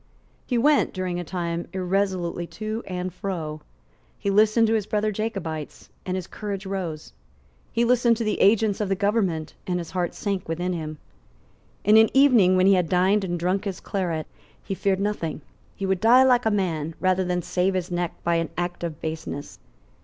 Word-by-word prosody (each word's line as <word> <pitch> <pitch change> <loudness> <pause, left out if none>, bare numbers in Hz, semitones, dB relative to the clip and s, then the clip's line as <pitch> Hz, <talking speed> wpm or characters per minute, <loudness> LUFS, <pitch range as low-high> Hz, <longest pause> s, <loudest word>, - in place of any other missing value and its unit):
He 245 - 0
went 290 +5 +3
during 185 -2 -2
a - - -3
time 170 -1 -3
irresolutely 185 -2 -1
to 215 +1 -3
and 180 -1 -4
fro. 165 -5 -4 0.6
He 200 - -1
listened 215 +3 +4
to 220 - +2
his 215 -2 0
brother 215 0 0
Jacobites; 195 -8 -5 0.2
and 185 - -1
his 185 -2 -3
courage 200 -2 -5
rose. 180 - -5 0.6
He 235 - +2
listened 240 -1 +3
to 230 - -2
the 215 - -1
agents 210 0 +3
of 205 - -1
the 195 - +2
government; 195 -5 0
and 180 -1 0
his 170 -2 -6
heart 180 -2 -2
sank 195 -4 -3
within 175 +3 -1
him. 155 -2 -5 0.9
In 210 +2 +6
an 225 0 +6
evening 245 -10 +6
when 185 - +4
he 195 - +6
had 180 -4 +2
dined 190 +3 +3
and 175 -2 -2
drunk 185 +4 0
his 195 -2 -3
claret, 175 -5 -2 0.4
he - - -4
feared 190 0 0
nothing. 195 -7 -2 0.3
He 195 - -4
would 190 -1 +1
die 245 +4 +7
like 245 -3 +4
a - - +5
man, 165 -6 -1
rather 185 0 +2
than 180 -1 -1
save 185 +3 0
his 180 -1 -2
neck 175 -1 -2
by 170 0 +2
an 165 -1 -1
act 175 0 -3
of 165 -3 -5
baseness. 160 -2 -5
185 Hz, 190 wpm, -24 LUFS, 175-210 Hz, 0.9 s, die